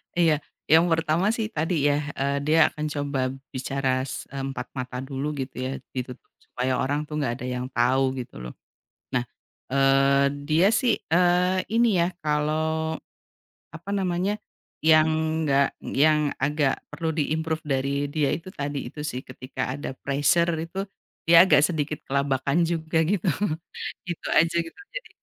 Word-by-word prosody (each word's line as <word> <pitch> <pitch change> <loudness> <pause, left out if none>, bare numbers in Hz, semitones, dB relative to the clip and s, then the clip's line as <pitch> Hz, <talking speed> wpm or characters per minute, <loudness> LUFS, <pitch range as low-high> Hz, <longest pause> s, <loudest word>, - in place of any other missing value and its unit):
Iya, 165 -3 +4 0.4
yang 160 +2 +7
pertama 165 +2 +2
sih 220 -2 -1
tadi 160 +4 -1 0.2
ya, 145 - +3 0.2
eee, 140 +1 +1
dia 155 +2 +4
akan 150 0 -4
coba 145 -2 -2 0.3
bicara 135 +1 -2 0.2
s - - -5
empat 135 0 -4
mata 125 0 -4
dulu, 135 +1 -4
gitu 130 0 -5
ya, 130 - -2 0.2
ditutup 125 -1 -6
supaya 130 +1 -2
orang 145 +3 0
tuh 150 - -9
nggak 130 -5 0
ada - - -4
yang 125 0 -3
tahu, 130 +2 +2
gitu 120 - -12
loh. 60 - -7 0.6
Nah, 125 -1 +1 0.5
eee, 135 0 +4 0.2
dia 160 +5 +4
sih, 245 -3 +3
eee, 180 +2 +3
ini 235 +1 +4
ya, - - +3
kalau, 155 +1 0 0.8
apa 170 +5 -8
namanya, 195 +1 0 0.4
yang 155 0 +6 0.4
enggak 140 -1 +4
yang 150 0 +2
agak 145 -1 +2 0.2
perlu 160 -1 -2
di-improve 160 +1 -1
dari 135 -2 -1 0.2
dia 145 -2 +1
itu, 170 +3 -7
tadi 145 -5 -4
itu 150 - -9
sih, 125 - -4
ketika 130 0 -7
ada 145 - -5
pressure 145 +5 +2
itu 165 +4 -6 0.5
dia 170 +1 +7
agak 150 -5 +5
sedikit 150 -3 -2
kelabakan 140 +4 +1
juga, 160 -1 -1
gitu. 195 +2 0 0.8
Itu 175 -2 -5
aja, 165 +1 +4
gitu. 165 - -13 0.2
Jadi, - - -6
150 Hz, 150 wpm, -25 LUFS, 135-165 Hz, 0.8 s, yang